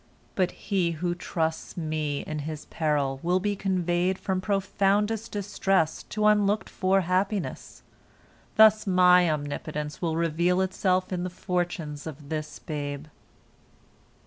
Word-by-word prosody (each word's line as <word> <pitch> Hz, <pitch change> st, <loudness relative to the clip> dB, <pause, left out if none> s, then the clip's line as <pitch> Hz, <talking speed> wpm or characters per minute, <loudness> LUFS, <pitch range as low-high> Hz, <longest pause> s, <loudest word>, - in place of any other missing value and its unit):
But 185 Hz, -2 st, +1 dB
he 180 Hz, -4 st, -1 dB
who 175 Hz, +2 st, -1 dB
trusts 160 Hz, -1 st, -3 dB
Me 155 Hz, -3 st, -2 dB
in 155 Hz, 0 st, -5 dB
his 150 Hz, 0 st, -6 dB
peril 145 Hz, -4 st, -1 dB
will 180 Hz, +2 st, +2 dB
be 205 Hz, +2 st, -1 dB
conveyed 185 Hz, -1 st, 0 dB
from 190 Hz, -1 st, -2 dB
profoundest 200 Hz, +3 st, 0 dB
distress 195 Hz, -5 st, 0 dB
to 215 Hz, 0 st, -2 dB
unlooked 210 Hz, 0 st, +3 dB
for 195 Hz, 0 st, +2 dB
happiness. 185 Hz, +2 st, -2 dB, 0.7 s
Thus 215 Hz, -1 st, +6 dB
My 180 Hz, -1 st, +6 dB
omnipotence 150 Hz, 0 st, -4 dB
will 165 Hz, -3 st, 0 dB
reveal 170 Hz, +2 st, +1 dB
itself 185 Hz, 0 st, 0 dB
in 175 Hz, -1 st, -2 dB
the 180 Hz, -, -2 dB
fortunes 175 Hz, -5 st, -3 dB
of 145 Hz, -2 st, -9 dB
this 155 Hz, -1 st, -4 dB
babe. 145 Hz, -2 st, -5 dB
180 Hz, 125 wpm, -27 LUFS, 155-195 Hz, 0.7 s, Thus